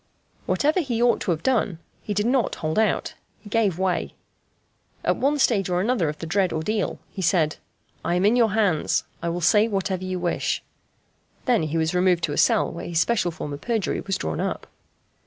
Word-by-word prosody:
Whatever 305 +5 +2
he 255 -9 -1
ought 240 0 +3
to - - -3
have 165 -2 0
done, 220 -9 +1 0.2
he 205 - -4
did 205 +2 +1
not 250 -2 +1
hold 155 +5 -1
out 220 -2 +1 0.3
he 205 - -13
gave 205 -6 +2
way. 185 -1 -1 0.9
At - - +2
one 285 +2 +1
stage 205 -9 +2
or 180 0 +1
another 200 -5 +1
of 150 - -5
the 165 - -6
dread 185 +2 +1
ordeal 205 +7 -1
he 190 - -6
said: 170 -3 +2 0.5
"I 175 - 0
am 180 +2 +2
in 215 +4 +4
your 230 -4 +3
hands. 200 -8 +1 0.2
I 170 - -1
will 175 +1 -3
say 210 +6 +4
whatever 195 -3 -2
you 185 0 -3
wish." 175 -1 -1 0.8
Then 215 - +1
was 160 0 +1
he - - -5
removed 180 -2 +3
to 145 - 0
a - - -4
cell - - +3
while 170 - -7
his 170 -2 0
special 195 -1 +2
form 150 -3 -6
of 145 - -7
perjury 225 -4 -1
was 195 -1 -2
drawn - - -3
up. - - -2
190 Hz, 205 wpm, -24 LUFS, 170-225 Hz, 0.9 s, in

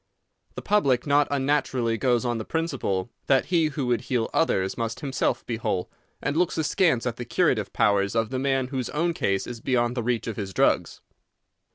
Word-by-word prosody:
The - - -6
public 140 -12 +2
not 145 0 +3
unnaturally 135 -4 0
goes 120 +1 +1
on 120 -2 -1
the - - -3
principle 125 - -2 0.2
that 135 -2 +3
he 170 -3 +2
who 140 -2 -3
would 120 -3 +1
heal 120 -3 -1
others 95 -12 +1
must 115 +2 -3
himself 135 -4 -1
be 115 - -3
whole, 95 -5 -2 0.3
and 145 - -1
looks 175 0 +1
askance 160 -5 +2
at 120 -1 -2
the 120 - -4
curative 120 - +1
powers 100 -1 +2
of 115 +1 0
the 130 - -1
man 135 -1 0
whose 130 -3 -3
own 170 +3 0
case 95 -11 0
is 120 -2 -7
beyond 120 -2 +1
the 120 - -1
reach 120 0 -1
of 115 - -5
his 95 -3 -5
drugs. - - +1
125 Hz, 195 wpm, -25 LUFS, 115-145 Hz, 0.3 s, not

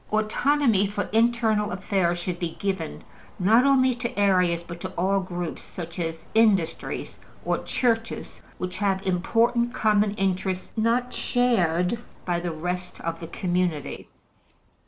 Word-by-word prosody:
Autonomy 215 0 +2
for 205 0 -2
internal 225 -2 +2
affairs 185 -2 0
should 175 0 -3
be 170 -2 -3
given, 190 -5 -3 0.3
not 220 +7 +4
only 260 -2 +4
to 240 -2 -5
areas, 180 -4 +3
but 170 0 -9
to 185 - -4
all 195 +3 +2
groups, 175 -3 -4
such 170 0 -8
as 165 -1 -4
industries 195 -7 +1 0.3
or - - +1
Churches, 230 -2 -1 0.2
which 180 0 -4
have 195 -1 0
important 230 +6 +1
common 210 -1 +2
interests 190 -1 -1
not 235 +3 +1
shared 190 -5 +1 0.3
by 175 -1 0
the 175 0 -3
rest 180 +3 -4
of 165 0 -3
the 165 - -7
community. 175 -4 -2
190 Hz, 135 wpm, -25 LUFS, 175-225 Hz, 0.3 s, not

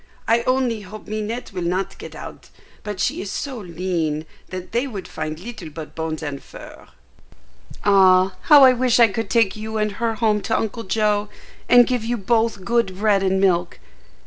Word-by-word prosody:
I 230 +1 +3
only 255 -4 +1
hope 205 +2 -10
Minette 215 +2 -4
will 185 - -4
not 180 +3 -2
get - - -9
out, - - -10 0.3
but 205 -3 -6
she - - 0
is 195 - -6
so 270 -4 -4
lean 170 -4 -2 0.2
that 185 -1 -7
they 240 +4 0
would 200 -8 -7
find 155 0 -5
little 195 -5 -8
but 155 0 -9
bones 160 0 -4
and 145 -2 -5
fur." - - -13 1.0
"Ah, 190 -2 +5 0.2
how 290 -3 +9
I 260 -1 +8
wish 250 -1 +2
I 235 - +8
could 215 +1 -4
take 225 -4 +2
you 220 +1 -5
and 215 0 0
her 225 +2 -2
home 215 -2 +1
to 225 - 0
Uncle 225 +1 -3
Joe, 210 0 0 0.4
and 245 0 +8
give 250 -2 -1
you 240 +2 -1
both 225 -2 0
good 235 -6 0
bread 205 -1 +2
and 190 0 +1
milk! 175 -3 +1
210 Hz, 185 wpm, -21 LUFS, 185-230 Hz, 1.0 s, how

